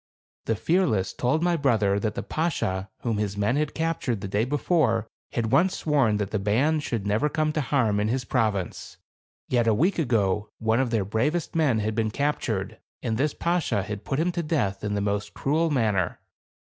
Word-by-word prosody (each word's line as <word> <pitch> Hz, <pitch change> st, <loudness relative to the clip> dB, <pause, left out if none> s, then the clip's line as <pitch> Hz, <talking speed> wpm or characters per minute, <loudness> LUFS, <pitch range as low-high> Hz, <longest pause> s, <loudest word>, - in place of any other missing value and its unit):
The 115 Hz, -, +1 dB
Fearless 135 Hz, -, +1 dB
told 150 Hz, +7 st, 0 dB
my 175 Hz, -1 st, +2 dB
brother 110 Hz, -9 st, +2 dB
that 105 Hz, 0 st, -2 dB
the -, -, -3 dB
Bashaw 100 Hz, -, -1 dB
whom 115 Hz, -3 st, -1 dB
his 100 Hz, -1 st, -2 dB
men 105 Hz, +5 st, +1 dB
had 150 Hz, 0 st, -1 dB
captured 160 Hz, -9 st, -1 dB
the 100 Hz, -, -4 dB
day 105 Hz, +3 st, +1 dB
before 135 Hz, -, +1 dB, 0.3 s
had 115 Hz, -2 st, -1 dB
once 185 Hz, +2 st, +3 dB
sworn 135 Hz, -9 st, +2 dB
that 105 Hz, -1 st, -3 dB
the 110 Hz, -, 0 dB
band 130 Hz, +11 st, +2 dB
should 115 Hz, -8 st, -3 dB
never 105 Hz, +9 st, +1 dB
come 155 Hz, 0 st, 0 dB
to 155 Hz, -, 0 dB
harm 120 Hz, -7 st, +1 dB
in 105 Hz, -, +1 dB
his 125 Hz, +2 st, -1 dB
province. 110 Hz, -7 st, -1 dB, 0.5 s
Yet 120 Hz, -2 st, +1 dB
a 110 Hz, -, +4 dB
week 175 Hz, -, +2 dB
ago, 105 Hz, -, +1 dB
one 110 Hz, +2 st, +1 dB
of 130 Hz, -2 st, +1 dB
their 110 Hz, -4 st, 0 dB
bravest 150 Hz, -, -1 dB
men 140 Hz, -9 st, +2 dB
had 110 Hz, +1 st, -1 dB
been 110 Hz, 0 st, 0 dB
captured, 115 Hz, -7 st, -2 dB, 0.2 s
and 110 Hz, -, 0 dB
this 140 Hz, +5 st, 0 dB
Bashaw 170 Hz, -, 0 dB
had 105 Hz, +1 st, -6 dB
put 135 Hz, -, -2 dB
him 175 Hz, +3 st, +1 dB
to 175 Hz, 0 st, -2 dB
death 115 Hz, -, -1 dB
in 105 Hz, -1 st, -1 dB
the 100 Hz, -, 0 dB
most 105 Hz, 0 st, -2 dB
cruel 160 Hz, +4 st, +1 dB
manner. 110 Hz, -, 0 dB
115 Hz, 195 wpm, -26 LUFS, 105-150 Hz, 0.5 s, a